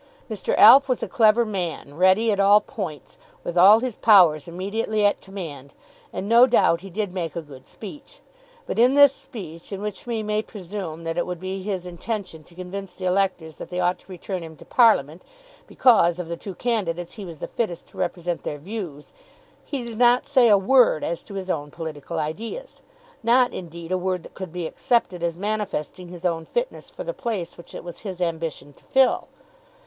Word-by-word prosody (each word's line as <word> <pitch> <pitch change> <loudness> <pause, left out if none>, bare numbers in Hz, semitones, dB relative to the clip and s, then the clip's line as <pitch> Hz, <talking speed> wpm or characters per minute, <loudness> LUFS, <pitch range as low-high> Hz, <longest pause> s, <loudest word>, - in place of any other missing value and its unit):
Mr. 210 -4 -1
Alf 270 +5 +8
was 255 - 0
a - - -2
clever 230 -2 +4
man, 175 -8 -4
ready 190 +7 +4
at 200 - -1
all 200 +1 +6
points, 190 - -7 0.2
with 175 - -4
all 200 +5 +7
his 250 -4 -3
powers 175 -9 +5
immediately 205 +4 -1
at 205 - +2
command, 160 -9 -8 0.4
and, 195 - -5
no 235 +3 +7
doubt, 170 -8 +3
he 195 - -9
did 200 0 -3
make 170 -4 -4
a 170 - -3
good 135 -3 -14
speech. 290 - -11 0.5
But - - -3
in 250 +3 +5
this 285 -1 +7
speech, 185 - -10
in 195 - -4
which 210 +2 -6
we 230 -2 -2
may 210 0 0
presume 185 -6 -7
that 165 +1 -2
it - - -1
would 180 -2 -5
be 190 +1 -4
his 190 -2 -3
intention 180 -1 -5
to 170 - -15
convince 185 +1 -7
the 185 - -6
electors 180 -4 0
that - - -8
they 180 0 -3
ought 180 0 +1
to - - -17
return 185 +1 -5
him 160 -1 -9
to - - -14
Parliament, 180 - +3 0.4
because, 195 -9 +4
of 180 -2 -5
the 170 - -4
two 190 +1 -8
candidates, 175 -7 -2
he 210 - -8
was 170 -4 -8
the - - -6
fittest 210 -8 -3
to - - -18
represent 175 0 -2
their 145 - -4
views, 170 -3 -7 0.5
he 275 -4 -4
did 235 -1 -7
not 245 +2 +5
say 270 -4 +4
a 205 - +7
word 225 -3 +4
as 170 - -2
to 200 - -11
his 190 -1 -5
own 145 -5 -2
political 160 +1 -6
ideas, 225 - -5 0.4
not, 245 +2 +3
indeed, 170 -1 -8
a 185 - +1
word 185 -1 -2
that - - -13
could 190 -3 -7
be 175 -1 -4
accepted 185 0 0
as 170 -1 -2
manifesting 200 -4 -3
his 175 0 -9
own 165 -2 0
fitness 485 - -4
for - - -8
the - - -4
place 215 - -4
which 170 - -13
it - - -7
was 175 -1 -8
his 190 -4 -7
ambition 165 -4 -3
to - - -23
fill. 265 -1 +2
190 Hz, 205 wpm, -23 LUFS, 170-220 Hz, 0.5 s, Alf